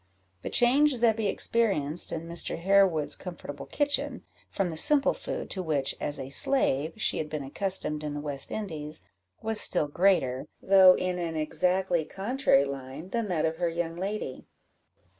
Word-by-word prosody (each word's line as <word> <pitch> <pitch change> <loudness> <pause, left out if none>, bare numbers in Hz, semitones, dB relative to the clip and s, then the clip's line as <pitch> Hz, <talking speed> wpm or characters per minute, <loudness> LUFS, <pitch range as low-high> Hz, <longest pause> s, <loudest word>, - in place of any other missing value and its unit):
The - - -5
change 270 +4 +4
Zebby 225 -3 +1
experienced 190 -8 +3
in 165 0 -5
Mr. 170 0 -2
Harewood's 180 -4 +2
comfortable 150 -6 -8
kitchen, 290 0 -1 0.3
from 190 -3 -2
the - - -6
simple 280 - +3
food - - -5
to 190 - -3
which, 150 -6 -1
as 145 - -3
a 135 +1 -7
slave, 155 - +1
she 220 - -1
had 155 - -4
been 150 -2 -4
accustomed 150 0 -3
in 150 -1 -4
the - - -4
West 145 -2 -4
Indies, 155 -7 -6 0.4
was 220 -1 0
still 155 -5 +4
greater, 145 -6 +1
though 190 -1 +6
in 180 -1 -2
an 165 -2 -3
exactly 175 +3 0
contrary 195 - +1
line, 140 +4 -7
than 230 +1 -2
that 175 -5 0
of 160 0 -2
her 175 0 0
young 165 0 -3
lady. 190 -6 -5
170 Hz, 160 wpm, -27 LUFS, 150-200 Hz, 0.4 s, though